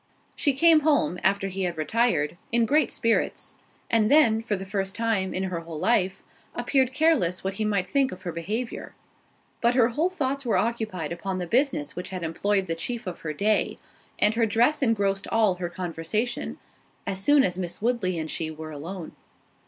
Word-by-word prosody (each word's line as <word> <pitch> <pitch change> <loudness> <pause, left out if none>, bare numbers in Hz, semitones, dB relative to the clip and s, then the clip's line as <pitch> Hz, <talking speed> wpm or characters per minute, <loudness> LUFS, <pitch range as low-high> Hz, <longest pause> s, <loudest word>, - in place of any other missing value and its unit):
She 285 - +1
came 320 +3 +6
home, 285 - +1
after 195 0 +2
he 195 0 -4
had 175 -3 -1
retired, 160 -3 +1 0.2
in 235 0 +3
great 295 +6 +2
spirits; 230 -2 0 0.3
and 220 -2 +2
then, 230 -8 +5
for 225 -2 -1
the 195 0 -6
first 195 0 -3
time, 225 -5 0
in 185 - -2
her 185 -3 -2
whole 165 -1 -8
life, 190 +1 +1 0.3
appeared 255 +1 +1
careless 265 - +2
what 190 0 -2
he 215 +2 -2
might 200 -3 +1
think 270 +7 +1
of 185 0 -9
her 175 - -3
behaviour:—but 225 +5 -5
her 240 -2 +5
whole 310 +9 +1
thoughts 275 -6 -2
were 235 - +1
occupied 215 -9 -2
upon 185 +2 -3
the 180 - -3
business 200 - 0
which 180 - -5
had 185 -2 -5
employed 195 +4 0
the 165 - -2
chief 225 +9 -5
of 180 - -5
her 155 - -4
day; 205 +8 +1 0.4
and 210 - +4
her 225 0 +2
dress 240 +9 +2
engrossed 200 -5 +1
all 220 -4 +3
her 175 - -2
conversation, 185 - -3 0.5
as 195 -1 -2
soon 290 +2 +5
as 180 -4 0
Miss 175 -2 -4
Woodley 215 -6 0
and 160 -1 -3
she 160 - -2
were 155 0 -8
alone. 165 +4 -7
200 Hz, 185 wpm, -26 LUFS, 180-240 Hz, 0.5 s, came